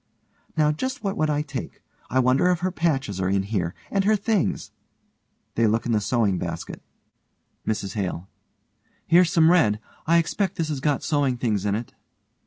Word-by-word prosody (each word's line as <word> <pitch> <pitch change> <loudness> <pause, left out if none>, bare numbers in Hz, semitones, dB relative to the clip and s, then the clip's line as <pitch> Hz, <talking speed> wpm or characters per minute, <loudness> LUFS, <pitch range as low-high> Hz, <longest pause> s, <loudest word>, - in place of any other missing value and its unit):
Now, 150 -1 +4
just 260 - -4
what 195 -1 -1
would 155 0 +1
I 150 0 +1
take? 140 -3 -6 0.3
I 130 - 0
wonder 130 +6 +4
if 175 -2 +1
her 185 +1 0
patches 135 - -1
are 90 - 0
in 95 0 +1
here 95 -4 -2 0.2
and 195 -1 +2
her 215 +2 +4
things. 210 -2 -1 0.8
(They 115 -1 +2
look 110 +2 +1
in 120 - -1
the 110 -2 +2
sewing 105 -5 +1
basket.) 85 -1 -5 0.9
MRS 100 -3 -2
HALE: 95 -3 -3 0.8
Here's 175 +1 +5
some 165 -3 +5
red. 110 -13 +3 0.3
I 170 +1 +5
expect 185 +3 0
this 160 -2 -2
has 145 -3 -2
got 145 -1 0
sewing 140 -4 +1
things 105 -5 0
in 100 - +1
it. 115 +2 -5
135 Hz, 180 wpm, -24 LUFS, 105-170 Hz, 0.9 s, Here's